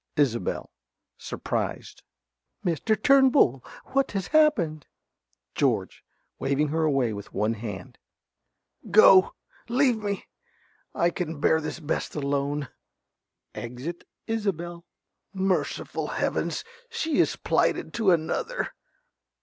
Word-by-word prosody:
_) -, -, -2 dB
~Isobel~ 120 Hz, -9 st, 0 dB, 0.4 s
(surprised). -, -, -4 dB, 0.6 s
Mr. 190 Hz, +5 st, +1 dB
Turnbull! 265 Hz, -, +5 dB, 0.3 s
What 275 Hz, -4 st, +1 dB
has 195 Hz, -2 st, -1 dB
happened? 210 Hz, -, +3 dB, 0.7 s
~George~ -, -, 0 dB, 0.4 s
(waving 140 Hz, +2 st, +1 dB
her 160 Hz, +2 st, 0 dB
away 135 Hz, -7 st, +2 dB
with 100 Hz, -1 st, -8 dB
one 105 Hz, +3 st, +1 dB
hand). 105 Hz, -5 st, -7 dB, 0.9 s
Go! 195 Hz, -3 st, +7 dB, 0.3 s
Leave 250 Hz, -2 st, +3 dB
me! 200 Hz, -2 st, -3 dB, 0.7 s
I 170 Hz, +1 st, +2 dB
can 165 Hz, -4 st, -4 dB
bear 160 Hz, +2 st, +3 dB
this 155 Hz, +2 st, -5 dB
best 155 Hz, -1 st, -3 dB
alone. 140 Hz, -1 st, -1 dB, 0.8 s
(Exit 125 Hz, +9 st, -6 dB, 0.2 s
Isobel.) 175 Hz, -6 st, -3 dB, 0.5 s
Merciful 190 Hz, 0 st, -1 dB
heavens, -, -, -1 dB, 0.3 s
she 390 Hz, -10 st, -1 dB
is -, -, +3 dB
plighted -, -, 0 dB
to 220 Hz, -4 st, +2 dB
another. 175 Hz, -, 0 dB
170 Hz, 100 wpm, -26 LUFS, 140-215 Hz, 0.9 s, Go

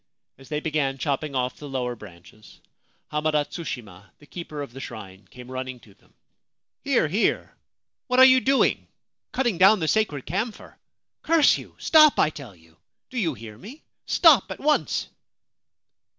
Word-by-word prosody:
As 135 Hz, -, -16 dB
they 150 Hz, -1 st, -2 dB
began 145 Hz, -4 st, -1 dB
chopping 140 Hz, 0 st, -3 dB
off 125 Hz, -1 st, -2 dB
the 145 Hz, -, -9 dB
lower 125 Hz, -2 st, -3 dB
branches, 105 Hz, 0 st, -16 dB, 0.5 s
Hamada 150 Hz, -1 st, 0 dB
Tsushima, 105 Hz, -, -8 dB
the 145 Hz, -, -19 dB
keeper 150 Hz, -2 st, -7 dB
of 135 Hz, -, -11 dB
the 135 Hz, -, -9 dB
shrine, 100 Hz, -7 st, -10 dB
came 125 Hz, 0 st, -12 dB
running 130 Hz, -1 st, -6 dB
to 100 Hz, -, -19 dB
them. -, -, -31 dB, 0.3 s
' -, -, -62 dB
Here, 270 Hz, -, +2 dB
here! 200 Hz, +9 st, -1 dB, 0.5 s
What 250 Hz, -1 st, 0 dB
are 260 Hz, -, +10 dB
you 260 Hz, 0 st, +6 dB
doing? 270 Hz, +1 st, +1 dB, 0.4 s
Cutting 240 Hz, -9 st, -1 dB
down 195 Hz, +3 st, +6 dB
the 160 Hz, -, -2 dB
sacred 155 Hz, -9 st, 0 dB
camphor? 210 Hz, +7 st, -5 dB, 0.5 s
Curse 325 Hz, -3 st, +4 dB
you! -, -, -13 dB
Stop, 310 Hz, -2 st, +5 dB
I 155 Hz, -, +3 dB
tell 130 Hz, -10 st, -11 dB
you! 80 Hz, 0 st, -24 dB, 0.3 s
Do 255 Hz, -, -3 dB
you 165 Hz, -, -1 dB
hear 110 Hz, -1 st, -11 dB
me? 255 Hz, -, -12 dB, 0.2 s
Stop 275 Hz, -, +5 dB
at 190 Hz, -, -7 dB
once 300 Hz, +1 st, 0 dB
150 Hz, 165 wpm, -24 LUFS, -, 0.5 s, are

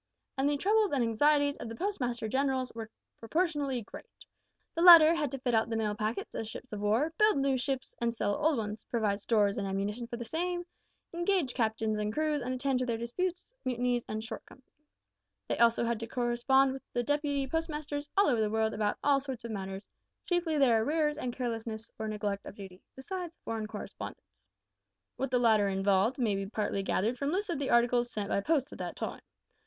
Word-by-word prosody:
And 270 Hz, +1 st, +1 dB
the 290 Hz, -, +1 dB
troubles 420 Hz, +5 st, +2 dB
and 270 Hz, -4 st, +2 dB
anxieties 285 Hz, +5 st, +3 dB
of 230 Hz, -, -7 dB
the 225 Hz, -, -6 dB
Postmaster 245 Hz, -, -2 dB
Generals 260 Hz, +1 st, 0 dB
were 225 Hz, -1 st, -6 dB, 0.3 s
proportionately 285 Hz, -2 st, -1 dB
great. 470 Hz, -, -13 dB, 0.5 s
The 335 Hz, -, -2 dB
latter 335 Hz, -2 st, +10 dB
had 305 Hz, -4 st, 0 dB
to 270 Hz, -, -4 dB
fit 250 Hz, -2 st, -1 dB
out 225 Hz, 0 st, +2 dB
the 225 Hz, -, -1 dB
mail 215 Hz, -2 st, 0 dB
packets 215 Hz, +2 st, -3 dB
as 225 Hz, -, -4 dB
ships 225 Hz, +2 st, -9 dB
of 205 Hz, -, -4 dB
war, 230 Hz, +10 st, +1 dB
build 425 Hz, -6 st, +5 dB
new 275 Hz, -1 st, +2 dB
ships, 260 Hz, 0 st, -2 dB
and 235 Hz, 0 st, +2 dB
sell 205 Hz, -3 st, -1 dB
old 310 Hz, -3 st, +3 dB
ones, 215 Hz, -1 st, -4 dB
provide 210 Hz, -4 st, 0 dB
stores 205 Hz, -1 st, +2 dB
and 200 Hz, -, -2 dB
ammunition 205 Hz, +5 st, -2 dB
for 235 Hz, -, -5 dB
the 235 Hz, -, -5 dB
same, 350 Hz, +6 st, -2 dB, 0.5 s
engage 345 Hz, -5 st, +1 dB
captains 220 Hz, -2 st, 0 dB
and 210 Hz, 0 st, -1 dB
crews, 305 Hz, +2 st, 0 dB
and 250 Hz, +1 st, -3 dB
attend 255 Hz, 0 st, 0 dB
to 255 Hz, -, 0 dB
their 230 Hz, -1 st, 0 dB
disputes, 350 Hz, +11 st, -3 dB, 0.2 s
mutinies, 245 Hz, -2 st, 0 dB
and 215 Hz, 0 st, -3 dB
shortcomings. 250 Hz, +3 st, -10 dB, 0.7 s
They -, -, 0 dB
had -, -, -2 dB
also 230 Hz, 0 st, +1 dB
to 230 Hz, 0 st, -5 dB
correspond 250 Hz, +3 st, +2 dB
with 270 Hz, -, -7 dB
the 240 Hz, -, 0 dB
deputy 290 Hz, 0 st, 0 dB
postmasters 300 Hz, -1 st, -3 dB
all 400 Hz, -, +6 dB
over 240 Hz, -5 st, +2 dB
the 215 Hz, -, +1 dB
country 220 Hz, 0 st, +1 dB
about 210 Hz, -1 st, 0 dB
all 285 Hz, -1 st, +4 dB
sorts 265 Hz, -4 st, -6 dB
of 230 Hz, -, -5 dB
matters 195 Hz, -1 st, -5 dB, 0.4 s
chiefly 345 Hz, -3 st, 0 dB
their 240 Hz, -6 st, +4 dB
arrears 300 Hz, +3 st, +1 dB
and 250 Hz, -5 st, -2 dB
carelessness 225 Hz, -2 st, -4 dB
or 220 Hz, -, -2 dB
neglect 205 Hz, -2 st, -3 dB
of -, -, -9 dB
duty 190 Hz, -2 st, -10 dB
besides 345 Hz, +4 st, -6 dB
foreign 220 Hz, -1 st, -3 dB
correspondence. -, -, -8 dB, 0.8 s
What 270 Hz, -, -1 dB
the 250 Hz, -, +2 dB
latter 220 Hz, -4 st, +4 dB
involved 195 Hz, +4 st, +2 dB
may 230 Hz, -6 st, +1 dB
be 195 Hz, 0 st, -2 dB
partly 205 Hz, -1 st, -2 dB
gathered 220 Hz, +5 st, 0 dB
from 280 Hz, -, 0 dB
lists 390 Hz, +1 st, -1 dB
of 330 Hz, -, -2 dB
the 280 Hz, -, -2 dB
articles 240 Hz, 0 st, +3 dB
sent 205 Hz, -1 st, -3 dB
by 200 Hz, -, +1 dB
post 290 Hz, +2 st, +1 dB
at -, -, -11 dB
that -, -, -4 dB
time. -, -, -5 dB
245 Hz, 200 wpm, -31 LUFS, 220-290 Hz, 0.8 s, latter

